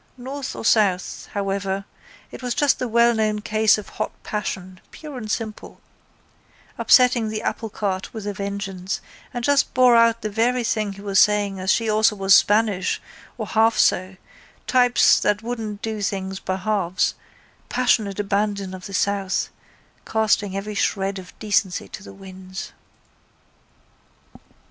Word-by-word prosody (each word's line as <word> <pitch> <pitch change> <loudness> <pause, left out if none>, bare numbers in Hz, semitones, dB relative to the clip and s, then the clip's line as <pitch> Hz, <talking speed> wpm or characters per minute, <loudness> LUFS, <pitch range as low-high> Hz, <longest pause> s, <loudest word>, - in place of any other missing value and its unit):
North 265 +2 -6
or - - -6
south, 200 -5 +1
however, 195 -1 -2 0.5
it - - -9
was 245 -1 -2
just 290 -1 +2
the 255 - -1
wellknown 225 -2 +3
case 215 +1 +3
of 210 - -8
hot - - -4
passion, 185 -3 -4
pure 300 -3 -10
and 225 -4 -6
simple, 220 -1 -5 1.0
upsetting 245 -3 +4
the 215 0 -4
applecart 200 -4 -3
with 220 -3 -7
a 205 - -2
vengeance 195 -1 -4 0.3
and 240 - -5
just 285 +1 +2
bore 250 -1 +6
out 230 0 +4
the 215 - -1
very 240 +3 +1
thing 215 -3 -1
he 195 - -12
was 195 -1 +2
saying 205 -2 +3
as 190 0 +1
she 230 - +1
also 215 0 +3
was 195 -1 +3
Spanish 205 -1 +3 0.4
or - - -3
half 225 +1 +2
so, 185 +1 +2 0.5
types 245 -2 +4
that 210 +1 0
wouldn't 220 -3 -5
do 220 -2 -3
things 190 -1 -3
by 185 - -3
halves, 185 -2 0 0.6
passionate 220 -5 +1
abandon 200 -1 -1
of 185 -1 -8
the 195 - -6
south, 200 -1 0 0.5
casting 210 -3 0
every 210 +2 -5
shred 195 -1 -1
of 180 -1 -13
decency 200 -3 0
to - - -9
the - - -11
winds. 190 -1 -9
210 Hz, 145 wpm, -22 LUFS, 195-225 Hz, 1.0 s, bore